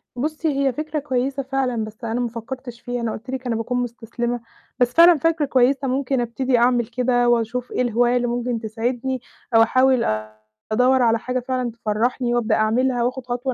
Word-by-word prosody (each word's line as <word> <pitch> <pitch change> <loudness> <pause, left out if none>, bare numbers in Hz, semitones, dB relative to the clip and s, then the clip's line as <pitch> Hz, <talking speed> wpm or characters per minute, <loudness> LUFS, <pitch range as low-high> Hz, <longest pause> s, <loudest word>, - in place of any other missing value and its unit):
بُصي، 305 +5 -2
هي 275 -2 +1
فكرة 305 +3 -3
كويّسة 270 0 -1
فعلًا، 260 -4 -1
بس 215 +2 -10
أنا 230 +1 -2
ما 245 - 0
فكّرتش 240 +1 -8
فيها، 245 0 -4
أنا 230 -1 -1
قُلت 235 +4 -8
لِك 260 -1 -4
أنا 235 - 0
باكون 230 +2 -2
مُستسلِمة. 240 0 -4 0.4
بس 245 0 +2
فعلًا 340 0 +7
فكرة 325 0 +1
كويّسة، 270 +1 +2
ممكن 265 0 0
أبتدي 245 +2 0
أعمل 240 0 +3
كده 245 0 +1
وأشوف 240 +1 0
إيه - - -1
الهواية 245 0 +2
اللي 245 0 0
ممكن 240 0 -2
تسعِدني، 240 +4 -3 0.3
أو 225 - +8
أحاول 255 +1 +3 0.7
أدوّر 250 +3 +3
على 230 -1 +3
حاجة 255 +2 -2
فعلًا 255 -1 -2
تفرّحني 235 +2 -1
وأبدأ 230 -2 +1
أعملها، 240 +3 +1
وآخُد 255 +1 -2
خطوة 245 +1 -2
245 Hz, 180 wpm, -22 LUFS, 235-260 Hz, 0.7 s, أو